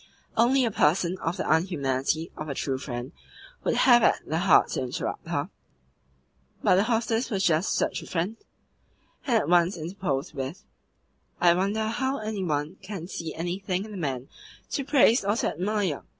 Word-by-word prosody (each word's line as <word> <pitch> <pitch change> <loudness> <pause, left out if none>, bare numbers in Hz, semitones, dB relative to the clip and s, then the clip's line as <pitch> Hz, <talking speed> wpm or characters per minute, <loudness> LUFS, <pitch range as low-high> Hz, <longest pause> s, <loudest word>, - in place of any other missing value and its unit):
Only 250 +3 +4
a 230 - 0
person 175 +1 +2
of 170 +4 -2
the - - -1
unhumanity 155 -2 0
of 155 0 -6
a 140 - -3
"true 135 -1 -2
friend" 125 0 -5 0.5
would - - +1
have 240 -2 +6
had - - +5
the 160 +2 -1
heart 180 -3 +5
to - - -2
interrupt 125 -1 -4
her; - - -2 1.1
but - - +5
the 195 +3 +4
hostess 230 +1 0
was 195 -5 -1
just 165 +1 +2
such - - 0
a - - -11
friend, 185 +6 -2 0.9
and 240 -4 +4
at - - 0
once 175 +2 +3
interposed 165 -3 -3
with: 135 +6 -5 0.8
"I 175 -1 +6
wonder 200 +5 0
how 265 +4 -1
any 215 -2 -3
one 155 +1 -2
can 190 -3 -6
see 165 -4 -5
anything 180 +3 -2
in 220 - -10
the - - -7
man 135 -6 -3 0.4
to 280 - -1
praise 260 -4 +4
or 205 +2 +1
to - - 0
admire. 190 -4 -1
180 Hz, 175 wpm, -26 LUFS, 155-215 Hz, 1.1 s, have